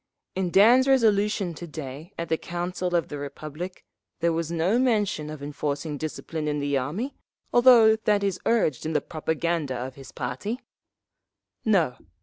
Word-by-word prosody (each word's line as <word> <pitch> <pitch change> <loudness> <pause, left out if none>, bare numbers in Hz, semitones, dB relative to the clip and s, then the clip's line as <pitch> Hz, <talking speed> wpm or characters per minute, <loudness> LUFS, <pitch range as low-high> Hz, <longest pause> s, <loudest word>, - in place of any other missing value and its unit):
In 185 -1 -1
Dan's 235 +8 +6
resolution 210 -7 +3
to 170 +2 -8
day 150 +2 -8
at 170 - -3
the 160 - +2
Council 175 +1 -3
of 170 - +1
the 145 - -5
Republic 155 +5 -7 0.3
there 170 0 +2
was 165 0 -2
no 175 +8 +2
mention 210 -11 +1
of 155 -2 -7
enforcing 145 0 -3
discipline 155 0 -4
in 150 0 0
the 145 0 0
army, 160 - -2 0.4
although 240 -3 +7
that 210 -2 +1
is 195 -2 0
urged 185 - +2
in 160 - -2
the - - +3
propaganda 160 -3 -2
of 125 +2 -5
his 135 0 -12
party…. 135 - -4 1.0
"No. 180 - +2
170 Hz, 155 wpm, -26 LUFS, 150-205 Hz, 1.0 s, although